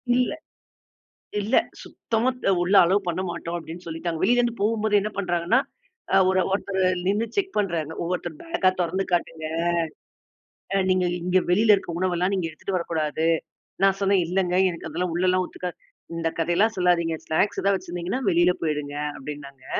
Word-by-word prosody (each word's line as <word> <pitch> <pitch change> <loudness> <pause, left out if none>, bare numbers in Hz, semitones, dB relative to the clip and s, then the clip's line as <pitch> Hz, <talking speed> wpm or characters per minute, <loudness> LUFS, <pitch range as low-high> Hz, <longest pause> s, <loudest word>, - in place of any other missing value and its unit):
இல்ல 250 0 +2 1.1
இல்ல. 215 +6 +1 0.3
"சுத்தமா 230 +3 -1 0.2
அ - - +5
உள்ள 185 +3 +1
அலோவ் 190 +2 +1
பண்ணமாட்டோம்" 175 -1 -3
அப்டின்னு 170 +2 -9
சொல்லிட்டாங்க. 165 0 -3
வெளியிலருந்து 240 +3 +3
போகும்போதே 215 0 +2
என்ன 210 +2 -3
பண்றாங்கன்னா, 180 +6 +2 0.5
அ - - +6
ஒரு 190 0 +3
ஒருத்தரு 195 -1 -1 0.2
நின்னு 210 +4 +1
செக் 385 -1 -1
பண்றாங்க. 165 -6 -1
ஒவ்வொருத்தர் 175 -2 -3
பேக்கா 330 - +2
தொறந்து 185 +3 0
காட்டுங்க. 165 -2 -1 1.3
அ - - +4
நீங்க 185 -1 +3 0.2
இங்க 180 +1 +3
வெளியில 210 +3 +6
இருக்க 175 -4 -5
உணவெல்லாம் 185 +1 +1
நீங்க 175 -3 -1
எடுத்துட்டு 185 +4 -3
வரக்கூடாது. 160 -1 -1 0.6
நான் 195 0 +4
சொன்னேன், 195 -1 +3
"இல்லைங்க, 180 0 0 0.2
எனக்கு 165 -1 -7
அதெல்லாம் 170 +2 -2
உள்ளலாம் 185 +1 +2
ஒத்துக்காது" 180 -1 -6 0.4
"இந்த 165 0 0
கதையெல்லாம் 175 +7 +2
சொல்லாதீங்க. 170 -2 +2
ஸ்நாக்ஸ் 200 +6 +1
ஏதாவது 200 -1 +3
வச்சிருந்தீங்கன்னா, 175 +7 -4
வெளியில 175 +1 +4
போய்டுங்க"அப்டின்னாங்க. 145 -2 -4
180 Hz, 140 wpm, -24 LUFS, 165-200 Hz, 1.3 s, அ